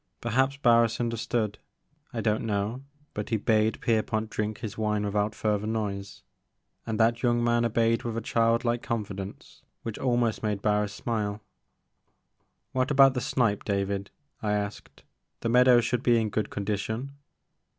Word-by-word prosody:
Perhaps 130 +4 +1
Barris 115 -4 +4
understood, 115 -2 -1 0.3
— 150 - -42
I 115 -3 -3
don't 105 0 +1
know, 105 +3 -2 0.3
but 105 - -4
he 115 - +1
bade 110 +1 +2
Pierpont 110 -1 0
drink 105 +1 -2
his 110 -2 -5
wine 105 -1 0
without 105 +1 0
further 105 -1 0
noise, 100 -3 -3 0.6
and 110 -1 -2
that 115 +1 +3
young 120 -1 +2
man 120 0 +2
obeyed 115 0 +2
with 115 -1 -4
a - - +1
child 115 +1 +1
like 120 0 +1
confidence 100 -4 -5 0.2
which 115 -2 -5
almost 120 -3 +1
made 105 -2 -2
Barris 105 -1 +1
smile. 105 -3 -2 1.3
What 130 +2 0
about 135 -2 +6
the 125 - -2
snipe, 115 -6 +1
David," 100 -1 -1 0.3
I 105 -1 0
asked; 105 0 -4 0.4
the 115 - -1
meadows 125 -1 +6
should 120 0 0
be 120 -2 +4
in 110 -1 0
good 105 0 -1
condition." 110 +6 -3
110 Hz, 155 wpm, -27 LUFS, 105-120 Hz, 1.3 s, about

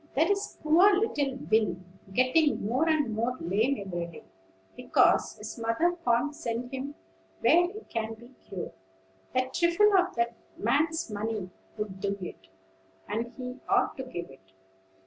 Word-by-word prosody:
There 320 +7 +3
is 400 0 -2
poor 350 +6 +6
little 285 - 0
Will 215 -5 +3 0.4
getting 255 +4 +3
more 260 +9 +2
and 295 -8 +2
more 235 +4 -1
lame 210 +8 +1
every 175 -2 -3
day, 170 - -12 0.5
because - - +3
his 210 +2 -7
mother 230 +11 +1
can't 240 +5 +2
send 240 +1 -4
him 275 +2 -4 0.5
where 350 +2 +5
he 425 +2 -8
can 225 0 -3
be 235 +2 -15 0.2
cured. 190 -2 -5 0.6
A 255 0 +2
trifle 345 +8 +4
of 365 -1 +3
that 235 0 +1 0.2
man's 295 +4 +1
money 210 -2 -3 0.3
would 205 -3 -4
do 200 0 -1
it, 95 - -8 0.6
and 230 +3 -2
he 250 0 -6
ought - - +3
to 265 - -4
give 175 - -6
it. 95 -8 -19
240 Hz, 150 wpm, -29 LUFS, 210-305 Hz, 0.6 s, poor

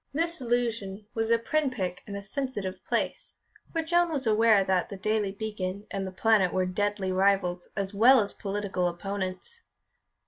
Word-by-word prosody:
This 335 0 0
allusion 230 -5 -1
was 225 0 -1
a 230 - +5
pin 295 +5 0
prick 185 -7 -4
in 200 - -6
a 200 - -5
sensitive 210 -4 -4
place, - - -2 0.3
for 325 -1 -1
Joan 345 +1 +2
was 280 -5 -2
aware 220 -2 +5
that 190 -1 +1
The 200 - -6
Daily 210 0 0
Beacon 200 -1 -4
and 195 -1 -2
The - - -5
Planet 195 -2 +3
were 185 0 +1
deadly 200 +1 -1
rivals 185 -2 +1
as 195 0 -2
well 245 +6 +7
as 205 -2 -1
political 195 -3 -2
opponents. 195 - -5
205 Hz, 170 wpm, -28 LUFS, 190-230 Hz, 0.3 s, well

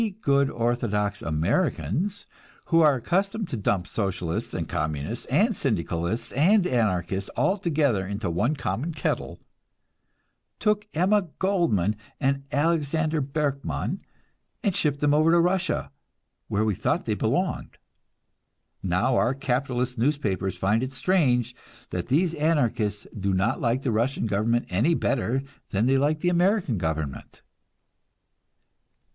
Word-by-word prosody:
We 225 - +1
good 140 -6 +3
orthodox 115 -5 -1
Americans, 85 - -1 0.4
who 165 -1 +5
are 150 -3 +5
accustomed 195 - -1
to - - -3
dump 100 -4 0
Socialists 90 -5 -2
and - - -3
Communists 80 +5 -3
and 210 - +2
Syndicalists 110 - -1
and 180 - +4
Anarchists 95 - 0
all 155 +11 +3
together 145 - +1
into 100 0 -3
one 120 - +1
common 135 - -3
kettle, - - -2 1.2
took 210 -1 +1
Emma 190 +3 +3
Goldman 145 - +1 0.2
and 140 0 0
Alexander 155 0 +1
Berkman 140 0 -2 0.6
and 200 -5 +1
shipped 145 -2 0
them 145 0 +3
over 155 +2 +4
to 170 +1 +5
Russia, 180 +2 0 0.6
where 105 +2 0
we 105 - +1
thought - - -1
they - - 0
belonged. - - -1 1.0
Now 95 +8 +1
our 125 +3 +2
capitalist 125 -2 -1
newspapers 105 - 0
find 105 +5 +1
it 130 +1 -4
strange 130 - +1 0.4
that 90 -1 -3
these 165 +6 +2
Anarchists 125 -10 0
do 95 0 0
not 100 +7 0
like 125 +2 0
the 130 - 0
Russian 115 +4 0
government 110 +3 +1
any 120 - +2
better 130 -1 0 0.3
than 100 +3 +1
they 135 +1 +3
like 150 +2 +1
the 175 - +2
American 175 - +2
government! 80 -4 -4
130 Hz, 130 wpm, -25 LUFS, 105-160 Hz, 1.2 s, who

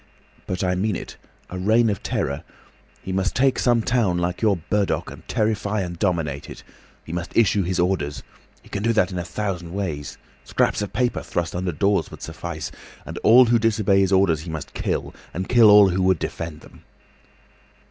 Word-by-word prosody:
But 90 - -2
I 90 0 +1
mean 100 +2 0
it. - - -7 0.4
A 90 - -5
Reign 110 +5 +3
of 100 -3 -1
Terror. 70 +1 -2 0.6
He 95 - -5
must 95 0 -1
take 135 0 +2
some 120 -2 +2
town 110 -8 +1
like 90 0 -2
your 105 -4 +3
Burdock 100 +4 -1
and - - -13
terrify 105 -1 0
and 85 -2 -5
dominate 80 -7 -1
it. - - -10 0.4
He 80 - -7
must 85 0 -4
issue 105 -3 +4
his 90 0 -1
orders. 85 -5 -1 0.4
He - - -18
can 100 - -3
do 115 +2 +2
that 100 -4 +2
in 90 - -3
a - - -2
thousand 90 -3 -4
ways—scraps 80 -4 -3
of 105 - -4
paper 125 +1 0
thrust 85 -1 -3
under 90 0 -1
doors 100 +6 +1
would - - -11
suffice. 85 -3 -6 0.3
And - - -6
all 125 +3 +7
who 120 0 +3
disobey 110 -3 +2
his 95 -1 +2
orders 95 -5 +3
he 85 - -8
must 80 -2 -6
kill, - - -2 0.2
and 95 +2 -3
kill 120 -3 +6
all 105 -1 +8
who 95 +1 0
would 95 -1 +3
defend 80 -1 -5
them." - - -17
95 Hz, 190 wpm, -23 LUFS, 85-105 Hz, 0.6 s, all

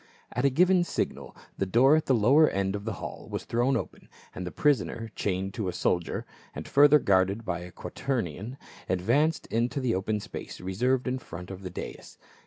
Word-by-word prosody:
At 125 +3 -1
a - - +6
given 180 +6 +4
signal - - -3 0.2
the 95 - 0
door 130 +9 +5
at 155 - 0
the 130 - +4
lower 135 +8 +5
end 95 0 -1
of 100 0 -6
the 110 - -2
hall - - -7
was - - -4
thrown 120 +3 +1
open - - -7 0.2
and 90 - -5
the - - -5
prisoner, 120 -6 0
chained 95 0 -2
to 100 0 -3
a 90 - -2
soldier, 90 -1 -1 0.3
and - - -6
further 145 +1 +7
guarded 100 -2 +2
by 85 - -2
a 90 0 -9
quaternion, 115 - -4 0.3
advanced 130 - +1
into 120 +5 0
the 125 -3 0
open 105 +3 -1
space - - -8
reserved 125 +8 0
in 130 +1 -1
front 90 -5 -9
of 95 0 -8
the 95 - -6
dais. 90 - -8
115 Hz, 195 wpm, -28 LUFS, 95-135 Hz, 0.3 s, further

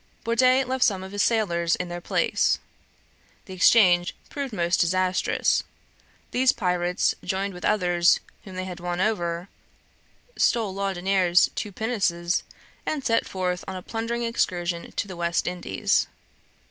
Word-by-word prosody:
Bourdet 255 +3 +3
left 260 0 0
some 190 -3 +1
of 190 - -8
his 205 0 -1
sailors 170 -8 +2
in 180 - -4
their 175 0 -6
place. - - +1 0.9
The 190 - -9
exchange 180 -2 +4 0.2
proved 280 -3 -4
most 175 -4 0
disastrous. 185 +1 +1 0.7
These 255 +1 +3
pirates 180 -2 0
joined 195 +1 -2
with 180 - -10
others 175 -4 +3 0.2
whom 190 -4 -10
they 185 0 -3
had 185 -1 -7
won 175 0 -3
over, 175 -4 -1 0.9
stole 220 -5 +1
Laudonniere's 190 -2 +2
two 210 - -4
pinnaces, 190 -5 0 0.4
and 290 -4 -3
set 230 -1 +2
forth 180 -1 -2
on 190 - -5
a 185 - -7
plundering 230 +2 -3
excursion 175 -7 -1
to - - -2
the 185 - -8
West 170 0 0
Indies. 175 - 0
185 Hz, 140 wpm, -25 LUFS, 175-220 Hz, 0.9 s, exchange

